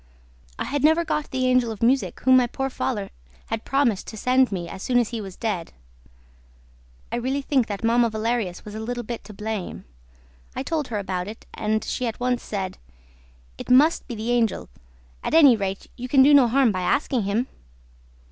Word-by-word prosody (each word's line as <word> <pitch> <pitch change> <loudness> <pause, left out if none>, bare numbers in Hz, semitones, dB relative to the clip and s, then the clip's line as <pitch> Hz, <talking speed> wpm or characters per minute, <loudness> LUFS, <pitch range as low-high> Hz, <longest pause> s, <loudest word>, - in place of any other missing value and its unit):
I - - -2
had 285 0 -2
never 320 +2 +4
got 300 -2 -2
the 260 -1 -1
Angel 250 -2 +3
of 220 0 -6
Music 260 +3 +1
whom 260 0 +5
my 250 -1 +5
poor 270 +2 -3
father 210 -6 -3 0.4
had 225 0 -3
promised 270 -8 +1
to 220 - -8
send 255 +2 +3
me 175 -3 -3
as 190 - -8
soon 245 +3 +1
as 240 -3 +2
he 230 -2 -4
was 190 -3 -8
dead. 200 -8 -3 1.4
I - - -1
really 265 +3 -2
think 265 -4 +1
that 205 0 -5
Mamma 235 +1 +3
Valerius 220 -4 -2
was 210 - -8
a 215 - -5
little 240 +2 -4
bit 235 +1 -6
to 210 - -10
blame. 210 -2 -5 0.7
I 260 - -3
told 305 -1 -2
her 225 - -3
about 185 -2 -3
it; 215 +2 -9
and 215 0 -1
she 250 - -2
at 225 - -5
once 245 0 0
said, 190 -3 -5 0.8
'It - - -8
must 285 +6 +4
be 240 - -5
the 225 +2 -3
Angel; 235 -3 0 0.5
at - - -1
any 285 -7 +8
rate, 195 -2 -3
you 250 - -6
can 265 +1 +5
do 290 +2 +6
no 275 -4 +7
harm 255 0 +3
by 185 -2 -2
asking 255 +6 +1
him.' 205 +5 0
235 Hz, 200 wpm, -24 LUFS, 215-260 Hz, 1.4 s, any